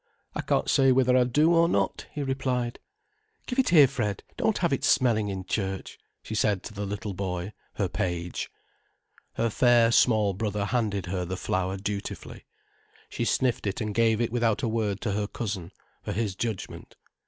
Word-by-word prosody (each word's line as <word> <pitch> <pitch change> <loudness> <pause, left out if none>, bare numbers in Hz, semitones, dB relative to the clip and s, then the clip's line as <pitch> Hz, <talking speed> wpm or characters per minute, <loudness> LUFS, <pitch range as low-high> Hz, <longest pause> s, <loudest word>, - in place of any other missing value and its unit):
"I - - -2
can't - - 0
say 135 -1 +4
whether 125 -1 +4
I 125 -1 +5
do 150 +7 +3
or 170 0 +4
not," 100 - 0
he 145 - -3
replied. 130 -3 -1 0.7
"Give 250 +1 -2
it 265 - +3
here, 155 -6 +8
Fred, 110 -7 -3
don't - - +1
have - - +1
it - - -1
smelling 110 -5 +3
in 95 -1 -4
church," 95 0 -3 0.2
she - - -6
said 105 -3 +1
to 110 - -8
the 100 0 -4
little 105 0 -4
boy, 90 +1 -4 0.2
her - - 0
page. 85 -1 -3 0.8
Her 115 0 0
fair, 120 0 +4
small 110 -4 +4
brother 105 0 -2
handed 105 -5 -1
her 90 0 -2
the 90 +1 -4
flower 95 +1 -1
dutifully. 100 +1 -5 0.6
She - - -2
sniffed 125 -5 +1
it 100 - -2
and 105 -1 -2
gave 115 0 +3
it 120 -2 0
without 115 -2 +1
a - - +2
word 110 -3 -1
to 110 - -1
her 105 +1 -1
cousin, 100 -6 -4 0.3
for - - -4
his 105 -1 -1
judgment. 110 -2 -5
110 Hz, 180 wpm, -27 LUFS, 100-120 Hz, 0.8 s, here